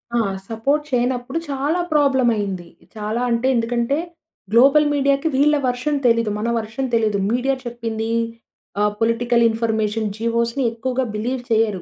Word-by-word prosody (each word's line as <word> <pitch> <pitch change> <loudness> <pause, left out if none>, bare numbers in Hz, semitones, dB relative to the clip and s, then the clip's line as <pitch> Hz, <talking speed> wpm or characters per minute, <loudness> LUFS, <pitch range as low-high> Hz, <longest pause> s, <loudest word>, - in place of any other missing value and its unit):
ఆ! - - +3 0.3
సపోర్ట్ 275 +7 0
చేయనప్పుడు 250 +3 -1
చాలా 285 +5 0
ప్రాబ్లమ్ 270 -4 +3
అయింది. 195 -4 -3 0.3
చాలా 215 +2 -2
అంటే 235 +2 +1
ఎందుకంటే, 235 +3 0 0.5
గ్లోబల్ 275 +6 +6
మీడియాకి 280 +1 +1
వీళ్ళ 295 +3 +4
వర్షన్ 255 +4 -1
తెలీదు. 230 -2 +3
మన 225 +3 -2
వర్షన్ 225 +4 -4
తెలీదు. 220 -3 +2
మీడియా 260 +3 +1
చెప్పిందీ, 230 -2 -4 0.7
ఆహ్, 210 0 +2
పొలిటికల్ 235 +1 +2
ఇన్‌ఫర్మేషన్, 220 -1 -1
జివోస్‌ని 235 +3 0
ఎక్కువగా 255 +3 -2
బిలీవ్ 245 +4 -2
చేయరు 220 -5 +1
235 Hz, 130 wpm, -21 LUFS, 225-265 Hz, 0.7 s, గ్లోబల్